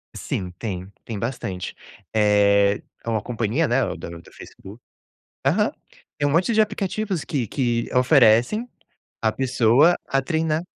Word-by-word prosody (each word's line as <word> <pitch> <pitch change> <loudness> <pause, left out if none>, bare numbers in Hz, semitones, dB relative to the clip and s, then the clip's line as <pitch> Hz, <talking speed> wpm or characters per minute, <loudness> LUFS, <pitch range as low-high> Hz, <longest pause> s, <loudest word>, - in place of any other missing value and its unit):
Sim, 90 -2 -4
tem, 95 -4 -4 0.2
tem 110 -3 -6
bastante, 100 -5 -4 0.4
eh, 100 -1 +3 0.2
é - - -4
uma 110 -2 0
companhia, 120 +7 -1
né, 120 - +1
é - - +2
o 90 -4 -4
da 85 - -8
do 85 0 -12
Facebook, 100 +5 -13 0.7
aham, - - +2 0.5
é 145 - +1
um 145 - +1
monte 180 +9 +2
de 215 - +5
aplicativos 205 -3 -2
que 130 -5 -2
que 120 0 -1
oferecem 125 - +4 0.6
a 110 -1 +2
pessoa 130 +5 +4
a 135 - +1
treinar. 160 +3 -1
120 Hz, 150 wpm, -23 LUFS, 105-155 Hz, 0.7 s, de